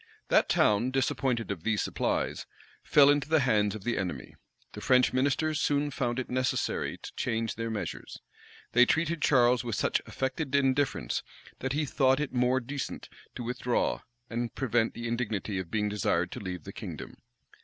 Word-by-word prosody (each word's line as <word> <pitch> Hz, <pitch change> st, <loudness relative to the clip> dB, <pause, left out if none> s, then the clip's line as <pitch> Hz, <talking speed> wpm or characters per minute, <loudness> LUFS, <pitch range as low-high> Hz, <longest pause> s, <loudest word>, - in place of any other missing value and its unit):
That -, -, +4 dB
town, 105 Hz, +4 st, +3 dB
disappointed 130 Hz, -3 st, 0 dB
of 95 Hz, -5 st, -4 dB
these 110 Hz, +3 st, 0 dB
supplies, -, -, -2 dB, 0.3 s
fell 145 Hz, -1 st, +6 dB
into 145 Hz, 0 st, 0 dB
the 160 Hz, -2 st, +4 dB
hands 105 Hz, -5 st, +2 dB
of 105 Hz, -, -8 dB
the 120 Hz, -1 st, -1 dB
enemy. 85 Hz, -10 st, -4 dB, 0.4 s
The -, -, -9 dB
French 125 Hz, 0 st, +4 dB
ministers 145 Hz, +4 st, +1 dB
soon 145 Hz, 0 st, +1 dB
found 125 Hz, -3 st, -1 dB
it 130 Hz, -, -2 dB
necessary 130 Hz, 0 st, -1 dB
to -, -, -10 dB
change 115 Hz, 0 st, -1 dB
their 115 Hz, +1 st, -4 dB
measures. 110 Hz, -2 st, -5 dB, 0.5 s
They 125 Hz, +1 st, +6 dB
treated 165 Hz, 0 st, +1 dB
Charles 125 Hz, -3 st, +4 dB
with 115 Hz, -3 st, -2 dB
such -, -, +1 dB
affected 135 Hz, +1 st, -2 dB
indifference, 140 Hz, 0 st, +1 dB, 0.4 s
that 130 Hz, 0 st, -2 dB
he 150 Hz, +1 st, 0 dB
thought 135 Hz, -1 st, +2 dB
it 150 Hz, -3 st, -3 dB
more 125 Hz, +1 st, +2 dB
decent 135 Hz, +2 st, -5 dB, 0.3 s
to 125 Hz, -, -5 dB
withdraw, 125 Hz, 0 st, -1 dB, 0.3 s
and 120 Hz, 0 st, -3 dB
prevent 120 Hz, -3 st, +1 dB
the 120 Hz, 0 st, -4 dB
indignity 110 Hz, -4 st, -2 dB
of 90 Hz, -3 st, -5 dB
being 105 Hz, +1 st, 0 dB
desired 90 Hz, -4 st, 0 dB
to -, -, -6 dB
leave 90 Hz, -4 st, -5 dB
the -, -, -9 dB
kingdom. -, -, -8 dB
125 Hz, 170 wpm, -29 LUFS, 110-135 Hz, 0.5 s, fell